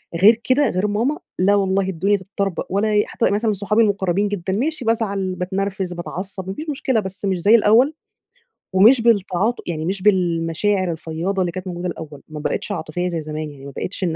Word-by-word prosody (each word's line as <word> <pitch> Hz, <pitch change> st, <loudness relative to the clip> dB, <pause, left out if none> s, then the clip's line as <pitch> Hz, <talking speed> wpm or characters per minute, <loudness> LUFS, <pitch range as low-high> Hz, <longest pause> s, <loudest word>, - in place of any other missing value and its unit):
غير 215 Hz, +7 st, +5 dB
كده، 275 Hz, +3 st, +3 dB
غير 185 Hz, +3 st, 0 dB
ماما، 230 Hz, +9 st, 0 dB, 0.2 s
لأ 195 Hz, +3 st, +4 dB
والله 195 Hz, -1 st, +1 dB
الدنيا 195 Hz, +3 st, +1 dB
تتطربق 195 Hz, -1 st, -3 dB
ولا 200 Hz, +3 st, +1 dB
أي 210 Hz, 0 st, +3 dB
حتى -, -, 0 dB
مثلًا 215 Hz, +1 st, +1 dB
صحابي 205 Hz, +3 st, +1 dB
المُقرّبين 200 Hz, -2 st, +1 dB
جدًا، 190 Hz, -2 st, -3 dB
ماشي 270 Hz, +5 st, -2 dB
بازعل، 200 Hz, -5 st, 0 dB
باتنرفز، 190 Hz, 0 st, -2 dB
باتعصّب 185 Hz, +2 st, -6 dB
ما 190 Hz, -, -3 dB
فيش 310 Hz, +9 st, -6 dB
مشكلة، 265 Hz, -4 st, 0 dB
بس 190 Hz, -1 st, -6 dB
مش 190 Hz, -2 st, +1 dB
زي 205 Hz, +6 st, +5 dB
الأول، 235 Hz, +6 st, +5 dB, 0.8 s
ومش 225 Hz, +7 st, +6 dB
بالتعاط 215 Hz, -1 st, +2 dB
يعني 160 Hz, -2 st, -3 dB
مش 190 Hz, +2 st, -2 dB
بالمشاعر 185 Hz, 0 st, +1 dB
الفيّاضة 165 Hz, +4 st, -3 dB
اللي 175 Hz, -1 st, 0 dB
كانت 185 Hz, +2 st, -6 dB
موجودة 175 Hz, 0 st, -4 dB
الأول، 155 Hz, -4 st, -7 dB
ما 155 Hz, -1 st, -7 dB
بقيتش 155 Hz, -, -3 dB
عاطفية 175 Hz, 0 st, -3 dB
زي 170 Hz, -2 st, -3 dB
زمان 155 Hz, 0 st, -5 dB
يعني، 140 Hz, -1 st, -13 dB
ما 140 Hz, -, -7 dB
بقيتش 185 Hz, +7 st, -5 dB
إن 170 Hz, -3 st, 0 dB
195 Hz, 190 wpm, -21 LUFS, 175-210 Hz, 0.8 s, ومش